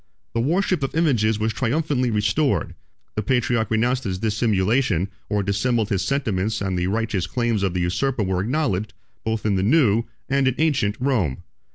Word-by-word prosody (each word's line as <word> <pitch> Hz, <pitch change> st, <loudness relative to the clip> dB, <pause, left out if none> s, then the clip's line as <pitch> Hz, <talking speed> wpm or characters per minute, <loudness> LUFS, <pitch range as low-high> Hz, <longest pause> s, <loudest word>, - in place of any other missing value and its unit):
The 115 Hz, -, 0 dB
worship 175 Hz, +4 st, +1 dB
of 135 Hz, -, -3 dB
images 120 Hz, -10 st, +2 dB
was 110 Hz, +1 st, -1 dB
triumphantly 130 Hz, 0 st, 0 dB
restored: 105 Hz, -, +1 dB, 0.4 s
the 110 Hz, -, -1 dB
patriarch 120 Hz, -1 st, +1 dB
renounced 120 Hz, +4 st, +1 dB
his 95 Hz, -3 st, -2 dB
dissimulation, 105 Hz, -2 st, +1 dB, 0.2 s
or 105 Hz, -1 st, 0 dB
dissembled 110 Hz, +3 st, 0 dB
his 100 Hz, -4 st, 0 dB
sentiments 110 Hz, -6 st, -1 dB
and 95 Hz, -2 st, -2 dB
the 90 Hz, 0 st, 0 dB
righteous 105 Hz, -3 st, -1 dB
claims 120 Hz, -1 st, 0 dB
of 95 Hz, -2 st, 0 dB
the 90 Hz, -, 0 dB
usurper 105 Hz, +8 st, 0 dB
was 95 Hz, -1 st, 0 dB
acknowledged, 110 Hz, -5 st, -1 dB, 0.3 s
both 110 Hz, -1 st, -2 dB
in 100 Hz, -3 st, +2 dB
the -, -, +1 dB
new, 115 Hz, -1 st, +3 dB, 0.2 s
and 135 Hz, 0 st, +2 dB
in 130 Hz, -, +1 dB
ancient, 140 Hz, -10 st, +1 dB
Rome. 115 Hz, -, 0 dB
110 Hz, 170 wpm, -23 LUFS, 100-130 Hz, 0.4 s, new